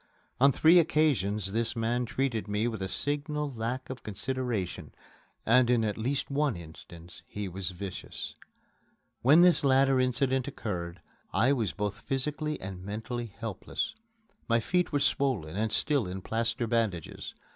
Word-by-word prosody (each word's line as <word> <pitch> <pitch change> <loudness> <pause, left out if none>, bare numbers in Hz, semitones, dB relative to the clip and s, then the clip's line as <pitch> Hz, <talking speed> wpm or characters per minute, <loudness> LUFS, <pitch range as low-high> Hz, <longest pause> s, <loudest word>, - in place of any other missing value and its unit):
On 140 +2 +6
three 165 +6 +6
occasions 110 - +2
this 115 +3 -1
man 120 +2 0
treated 125 -4 -1
me 105 +3 0
with 110 -4 -4
a 95 - -1
signal 145 - -1
lack 120 +3 -3
of 130 -1 -7
consideration, 120 -2 -3 0.5
and 120 +2 +5
in 120 -2 +3
at 105 -2 0
least 130 +6 -2
one 140 -3 +1
instance 85 +1 -12
he 105 -1 -5
was 95 0 -2
vicious. 95 +1 -6 0.9
When 145 +7 +7
this 180 -3 +5
latter 135 -1 +4
incident 130 +1 +1
occurred, 90 -9 -5 0.3
I 130 +5 +3
was 115 -7 0
both 105 +1 -3
physically 150 +3 -1
and 95 -1 -7
mentally 115 +4 -4
helpless. 110 -1 -4 0.6
My 115 0 +4
feet 180 +9 0
were 145 - +2
swollen 125 - 0
and 110 +1 0
still 140 -2 +1
in 95 +1 -6
plaster 115 +1 -1
bandages. 110 -8 -2
115 Hz, 145 wpm, -29 LUFS, 100-135 Hz, 0.9 s, When